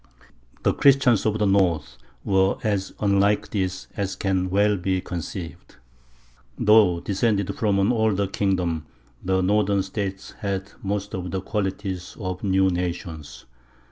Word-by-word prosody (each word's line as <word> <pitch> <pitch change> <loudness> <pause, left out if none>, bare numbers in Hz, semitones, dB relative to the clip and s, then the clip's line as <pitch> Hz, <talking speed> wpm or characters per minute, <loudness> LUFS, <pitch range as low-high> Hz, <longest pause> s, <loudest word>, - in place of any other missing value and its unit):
The - - +3
Christians 135 -6 +4
of 110 0 +1
the 105 - +1
north 85 -10 +1 0.3
were 95 0 +2
as 100 -3 -1
unlike 100 0 +2
this 95 -2 -2
as 95 -2 -2
can 95 -1 0
well 105 +2 +3
be 95 0 -1
conceived. 85 -1 -7 0.8
Though 105 -5 +5
descended 100 -1 0
from 105 -4 +1
an 100 +4 +3
older 110 -4 +1
kingdom, 90 -5 -1 0.4
the 95 0 +1
northern 100 0 +2
states 95 0 -5
had 100 -1 -3
most 100 0 -3
of 90 -1 -4
the 95 - -2
qualities 95 -2 -4
of 95 -3 -4
new 95 -1 +3
nations. 85 -4 -5
95 Hz, 135 wpm, -24 LUFS, 90-100 Hz, 0.8 s, Though